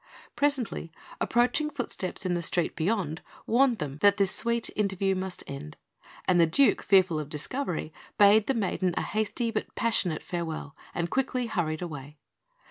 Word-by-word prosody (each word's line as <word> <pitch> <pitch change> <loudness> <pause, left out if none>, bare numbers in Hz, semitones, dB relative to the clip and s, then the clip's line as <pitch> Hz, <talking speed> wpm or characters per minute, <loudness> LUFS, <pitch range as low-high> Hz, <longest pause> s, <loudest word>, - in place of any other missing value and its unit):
Presently, 270 - 0 0.3
approaching 250 +6 +2
footsteps 240 -10 -2
in 180 - +1
the 175 - -1
street 170 0 0
beyond 170 -3 -1 0.2
warded 250 0 +3
them 145 -5 -5
that 200 0 +5
this 195 -2 +3
sweet 235 0 +1
interview 195 -2 +1
must 185 -1 -4
end; 140 - -8 0.5
and 180 -2 +4
the 165 - +5
Duke, 275 - +3
fearful 185 -5 +4
of 150 -1 -6
discovery, 160 - -3 0.2
bade 205 +1 +6
the 270 - +1
maiden 185 -4 0
a - - +1
hasty, 220 +2 -1
but 215 - -4
passionate 185 -8 +1
farewell, 160 -4 -5 0.2
and 170 -1 -2
quickly 260 -2 0
hurried 175 -7 -2
away. 150 -3 -8
190 Hz, 155 wpm, -28 LUFS, 165-230 Hz, 0.5 s, bade